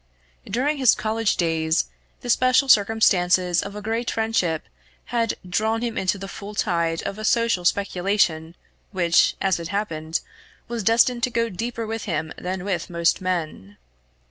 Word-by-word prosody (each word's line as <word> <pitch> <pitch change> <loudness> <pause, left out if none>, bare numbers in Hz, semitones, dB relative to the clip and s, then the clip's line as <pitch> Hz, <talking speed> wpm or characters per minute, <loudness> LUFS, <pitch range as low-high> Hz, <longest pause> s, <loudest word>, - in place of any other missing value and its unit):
During 275 +8 0
his 260 -3 +5
college 220 0 0
days, 160 -1 +1 0.4
the 245 - -7
special 255 +3 +3
circumstances 185 -6 +3
of 200 0 -7
a 210 - -7
great 225 +3 -2
friendship 220 -8 0 0.5
had 230 -2 +1
drawn 220 +5 0
him 235 -2 -2
into 190 +2 0
the 195 0 -7
full 205 +1 -8
tide 170 -5 0
of 200 - -5
a - - -6
social 230 -5 +1
speculation 180 -4 +1 0.4
which, 175 -4 +3
as 190 -3 +1
it 165 - -5
happened, 165 -5 -2 0.5
was 235 -1 -3
destined 235 +3 +3
to 250 - +1
go 230 -1 0
deeper 230 +4 -4
with 225 0 -4
him 160 -4 -3
than 185 +1 -4
with 185 -5 -2
most 170 +1 +1
men. 160 - -3
200 Hz, 155 wpm, -23 LUFS, 175-225 Hz, 0.5 s, his